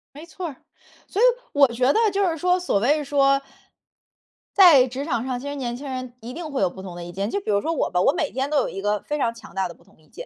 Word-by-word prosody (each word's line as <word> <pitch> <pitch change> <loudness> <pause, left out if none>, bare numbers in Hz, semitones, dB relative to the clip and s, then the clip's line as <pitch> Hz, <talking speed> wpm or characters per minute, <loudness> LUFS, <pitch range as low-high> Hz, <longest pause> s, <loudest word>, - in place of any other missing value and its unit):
没 305 - -10
错 345 +2 -6
儿， 295 - -8 0.5
所 410 - -2
以 - - +7 0.3
我 285 -1 +6
觉 250 +3 +1
得 - - +2
就 395 +1 +1
是 325 - -3
说 360 +3 +2
所 355 - 0
谓 295 +7 +2
说， 275 -1 +3 1.1
在 315 -10 +7
职 265 +3 -5
场 245 -6 -1
上 255 -2 -3
其 280 - -7
实 285 - -4
年 245 -4 -3
轻 280 +2 -8
人 255 -2 -5
一 240 +2 -8
定 315 0 -6
会 270 - -2
有 190 - +3
不 190 - -11
同 180 -2 -8
的 175 - -7
意 175 - -8
见， 195 +4 -3
就 400 - -1
比 300 - -2
如 200 - +2
说 325 +7 -1
我 - - 0
吧， 180 0 +1
我 - - +4
每 320 -4 -2
天 265 +2 -2
都 300 - +1
有 - - +1
一 195 - -6
个 205 0 0
非 295 - -3
常 235 -4 0
强 230 -1 -14
大 190 -1 -1
的 170 - -10
不 - - -25
同 - - -25
意 155 - -26
见。 - - -10
270 Hz, 315 characters per minute, -23 LUFS, 225-300 Hz, 1.1 s, 以